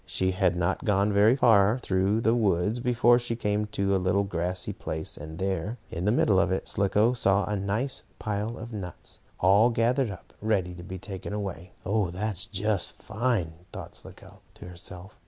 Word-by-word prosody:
She 95 0 0
had 90 -1 +1
not 90 +7 0
gone 105 -2 +2
very 105 +4 +5
far 110 -3 +5
through 100 -1 +1
the 115 0 +3
woods 105 -1 +1
before 120 0 +4
she 120 -1 -3
came 105 -1 -1
to 100 -1 0
a 95 - +1
little 95 +2 +2
grassy 90 -1 -2
place, 80 +4 -4
and 80 +2 -9
there, 95 +4 -2
in 85 +3 -3
the 105 - +3
middle 105 -4 +3
of 95 -1 +2
it, 95 - -2
Slicko 105 +4 +2
saw 100 -4 +3
a 105 +2 -2
nice 105 +7 -2 0.2
pile 110 +2 -3
of 115 +1 -8
nuts, 95 -4 -7 0.2
all 100 +6 +5
gathered 120 +2 +1
up, 95 -3 -10
ready 100 -5 0
to 90 - -9
be 95 +1 -7
taken 95 +1 -6
away. 95 -4 -5
"Oh, 100 -2 +1
that's 95 +2 -3
just 105 -1 0
fine!" 110 -7 -1 0.2
thought - - -8
Slicko - - -10
to - - -11
herself. 90 +2 -9
100 Hz, 185 wpm, -27 LUFS, 95-110 Hz, 0.2 s, very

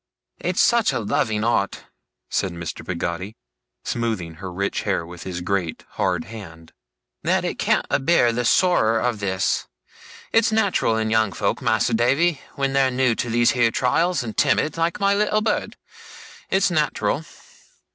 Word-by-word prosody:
'It's - - -2
such 235 -2 +4
a - - -1
loving 105 0 0
art,' 110 -4 0 0.5
said 95 - -1
Mr. 85 -1 -6
Peggotty, 90 +3 -4 0.5
smoothing 110 -8 -2
her 95 -1 -5
rich 100 +3 -2
hair 85 - -1
with 90 +1 -11
his 90 -2 -4
great 90 -3 -2
hard 90 -4 -1
hand, 80 -7 -11 0.5
'that - - +1
it - - -3
can't - - +2
abear 140 -3 +3
the 120 +1 -1
sorrer 115 -5 +3
of 120 -3 -1
this. 95 -1 -1 0.6
It's 225 0 +3
nat'ral 200 - +2
in 110 0 -1
young 110 -2 +2
folk, - - -1
Mas'r - - +1
Davy, 140 +7 +2
when 135 -1 -1
they're 135 -1 +3
new 125 -1 +2
to 120 - -3
these 120 +1 +3
here 120 -2 +3
trials, 155 +6 +1
and 110 -3 -6
timid, 155 - +2
like 165 +3 -1
my 200 0 +3
little 210 +1 +1
bird, 215 -1 -1 0.7
it's - - +2
nat'ral. - - 0
115 Hz, 155 wpm, -22 LUFS, 95-140 Hz, 0.7 s, such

